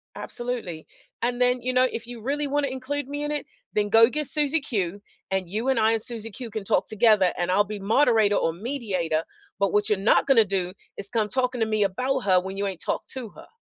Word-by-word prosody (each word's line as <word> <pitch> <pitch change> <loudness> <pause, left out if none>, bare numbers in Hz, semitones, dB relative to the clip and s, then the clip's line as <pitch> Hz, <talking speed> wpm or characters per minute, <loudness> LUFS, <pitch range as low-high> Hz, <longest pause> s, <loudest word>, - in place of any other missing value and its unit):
Absolutely, 235 -10 -5 0.3
"And 245 +1 -1
then, 250 0 +3
you 255 +1 -1
know, 255 - +4
if 235 - -6
you 240 -2 -8
really 285 +4 -1
wanna 285 0 0
include 265 +2 -4
me 290 +1 -4
in 295 - -2
it, 295 -1 -3 0.3
then 205 -1 +1
go 225 +3 +7
get 300 0 -2
Susie 300 +1 +1
Q, 200 - -2 0.3
and 190 -2 -2
you 220 +6 -2
and 265 - +2
I 220 0 +4
and 225 - 0
Susie 225 -1 -7
Q 245 +1 -7
can 215 -1 -5
talk 190 0 +1
together, 215 -4 +4
and 175 +1 0
I'll 205 +2 +4
be 210 0 -6
moderator 220 0 +3
or 165 - +1
mediator, 185 - -2 0.4
but 200 -1 +2
what 210 0 +2
you're 210 - +2
not 205 - +4
gonna 240 -6 +5
do, 185 -2 -2 0.2
is 200 - -6
come 220 -3 0
talking 250 0 -1
to 225 - +2
me 215 -1 +1
about 255 +8 0
her, 185 -5 +4
when 190 +1 -6
you 200 - -1
ain't 190 -3 -5
talked - - -3
to 255 -4 -6
her." - - -15
225 Hz, 235 wpm, -25 LUFS, 200-255 Hz, 0.4 s, go